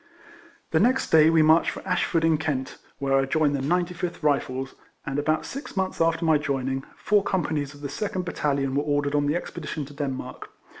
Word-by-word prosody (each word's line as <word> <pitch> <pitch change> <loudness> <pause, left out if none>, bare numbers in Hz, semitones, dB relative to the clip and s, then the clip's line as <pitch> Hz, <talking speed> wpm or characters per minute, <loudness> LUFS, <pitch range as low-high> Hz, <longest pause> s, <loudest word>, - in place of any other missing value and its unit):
The - - +3
next 260 +2 +2
day 160 -1 +7
we 160 -1 +5
marched 160 +2 +5
for - - -8
Ashford, 170 -2 +1
in 160 -2 +3
Kent, 140 -5 -3 0.2
wdiere 135 -1 +2
I - - 0
joined 145 +1 +1
the - - -1
95th 175 +3 -2
Rifles, 135 -2 0 0.3
and 135 +1 -2
about 155 +2 0
six 275 -6 -7
months 190 -2 -1
after 165 0 +2
my 160 -2 +4
joining, 135 -2 -2
four 205 0 +2
companies 150 -7 -1
of 145 - -15
the 145 - -3
second 195 -1 -3
battahon 140 -5 -1
were 140 - +2
or 145 -1 0
dered 145 0 -2
on 145 -1 +2
the 150 - +1
expedition 155 -3 -4
to 145 - -13
Denmark. 140 -2 -5
150 Hz, 200 wpm, -25 LUFS, 140-165 Hz, 0.3 s, day